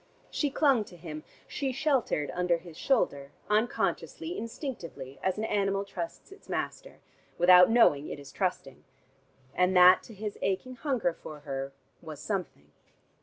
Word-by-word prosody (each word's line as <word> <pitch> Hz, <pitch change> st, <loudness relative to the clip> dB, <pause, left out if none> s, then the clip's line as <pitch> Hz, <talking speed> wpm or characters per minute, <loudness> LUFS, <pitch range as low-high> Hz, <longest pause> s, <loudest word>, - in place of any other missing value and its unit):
She 295 Hz, -, 0 dB
clung 275 Hz, -5 st, +3 dB
to 175 Hz, -, -14 dB
him, 155 Hz, -2 st, -8 dB, 0.2 s
she 275 Hz, -2 st, -2 dB
sheltered 255 Hz, -, 0 dB
under 180 Hz, -1 st, +1 dB
his 170 Hz, -1 st, -13 dB
shoulder, 145 Hz, -, 0 dB, 0.2 s
unconsciously, 240 Hz, +9 st, 0 dB
instinctively, 175 Hz, -, -7 dB
as 190 Hz, +1 st, 0 dB
an 215 Hz, -, -2 dB
animal 200 Hz, -2 st, 0 dB
trusts 170 Hz, -, -7 dB
his 395 Hz, -, -16 dB
master, -, -, -4 dB, 0.4 s
without 180 Hz, +1 st, +8 dB
knowing 155 Hz, -11 st, +4 dB
it -, -, -5 dB
is 140 Hz, -1 st, -11 dB
trusting. 180 Hz, -8 st, -3 dB, 0.7 s
And 180 Hz, +1 st, +2 dB
that 180 Hz, +1 st, +8 dB
to 225 Hz, -, -13 dB
his 210 Hz, +1 st, -5 dB
aching 195 Hz, +7 st, -2 dB
hunger 245 Hz, -, 0 dB
for 150 Hz, -2 st, -10 dB
her 135 Hz, -2 st, -4 dB, 0.3 s
was 155 Hz, -3 st, -9 dB
something.... 155 Hz, -, -4 dB
185 Hz, 145 wpm, -29 LUFS, 155-235 Hz, 0.7 s, without